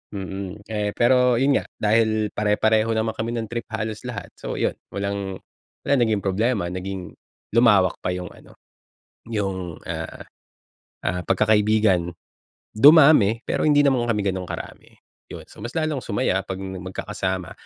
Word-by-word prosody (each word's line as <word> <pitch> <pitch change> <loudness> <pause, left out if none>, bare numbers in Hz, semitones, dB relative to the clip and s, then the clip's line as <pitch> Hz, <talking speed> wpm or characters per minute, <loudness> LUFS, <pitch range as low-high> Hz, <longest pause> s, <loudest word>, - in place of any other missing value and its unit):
Mm. 95 +1 -6
Eh, 105 -1 -1
pero 125 +1 +4
yun 135 +3 +3
nga, - - -9
dahil 110 0 +2
pare-pareho 110 +1 +2
naman 110 0 0
kami 115 +2 -2
ng 115 -2 -4
trip 120 -1 -4
halos 110 +1 -5
lahat, 105 -6 -6
so - - -5
yun, - - 0 0.2
walang 100 -1 -3 0.5
wala - - +1
naging 110 -4 +1
problema 100 0 0
naging 95 0 -5 0.4
lumawak 105 -5 +4
pa 90 - -2
yung 90 0 -6
ano, - - -17 0.7
yung, 95 -6 -3
ah, - - -6 0.8
ah, 90 0 -1
pagkakaibigan. 105 -3 +2 0.6
Dumami, 140 -3 +6
pero - - -1
hindi 145 -1 +5
naman 130 -4 +2
kami 105 -3 +1
ganong 90 -1 -5
karami, - - -8 0.3
yun. - - -9
So, - - -15
mas 120 +3 -7
lalong 155 -3 0
sumaya 100 -4 0
'pag 95 - -4
magkakasama. 95 -1 -4
105 Hz, 145 wpm, -23 LUFS, 95-115 Hz, 0.8 s, Dumami